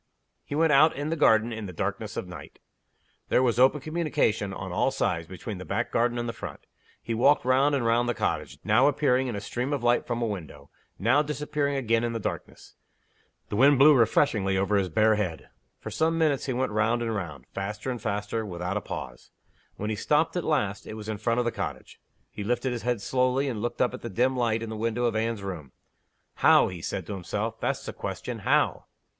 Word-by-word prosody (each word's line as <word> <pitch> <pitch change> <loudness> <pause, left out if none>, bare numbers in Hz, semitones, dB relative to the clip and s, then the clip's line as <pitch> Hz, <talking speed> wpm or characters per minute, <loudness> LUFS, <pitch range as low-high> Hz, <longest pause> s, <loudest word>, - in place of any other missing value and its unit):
He 145 - -5
went 160 0 +3
out 155 +3 +6
in 145 +3 -3
the - - +1
garden 115 -5 +3
in 110 -2 -5
the - - -7
darkness 85 - -4
of - - -3
the - - -10
night. - - -11 0.7
There 130 - +3
was 120 -2 +1
open 135 +3 +4
communication, 155 -10 0
on - - -6
all - - +2
sides, 80 -1 -1
between 95 +2 -7
the - - -6
back 115 +6 -2
garden 120 +1 +1
and 120 0 -2
the 115 - -3
front. 100 -9 -8 0.4
He 115 - -3
walked 130 +4 +3
round 135 +3 +3
and 130 -4 -1
round 120 +1 +2
the 120 - 0
cottage - - -2
now 110 +6 +4
appearing 130 -3 +2
in 120 - -3
a - - -3
stream 125 +6 -3
of 140 -4 -2
light 120 0 +2
from 120 -1 -2
a 120 - 0
window; 80 -9 -7 0.3
now 120 +8 +3
disappearing 150 -1 -2
again 115 -3 +1
in 120 0 -1
the 115 - -2
darkness. - - -6 0.8
The - - -3
wind 135 +5 +6
blew 145 +3 +8
refreshingly 110 -5 +2
over 100 +2 +1
his 95 -2 +1
bare 110 +5 +3
head. 85 -8 -3 0.3
For - - -7
some 165 +1 +1
minutes 150 -5 +1
he 130 - 0
went 130 0 -1
round 115 +3 +1
and 115 -1 -2
round, 75 - -5
faster 105 +5 -4
and 125 - -5
faster, 105 0 -2
without 90 0 -3
a - - -2
pause. - - -7 0.5
When 105 +1 -3
he - - -1
stopped 155 - +1
at 175 - -1
last, 105 -10 -1
it 110 - -6
was 110 0 -7
in 105 -2 -3
front 115 +2 0
of 125 - +1
the 120 - +1
cottage. - - -6 0.3
He 105 - -6
lifted 120 +4 -1
his 120 -2 -3
head 120 -3 -1
slowly, 130 +4 +1
and 115 -6 -3
looked 120 +2 0
up 125 - 0
at - - -7
the 115 - -5
dim 125 +6 +1
light 115 -2 0
in 110 - -5
the - - -4
window 115 +2 -1
of 115 -2 0
Anne's 110 -2 -1
room. 80 -9 -6 0.6
"How?" - - +5
he 90 -2 -8
said 95 +2 -4
to 100 - -5
himself. 90 -3 -4
"That's - - -2
the - - -5
question. - - -5
How?" - - +1
115 Hz, 225 wpm, -27 LUFS, 105-130 Hz, 0.8 s, blew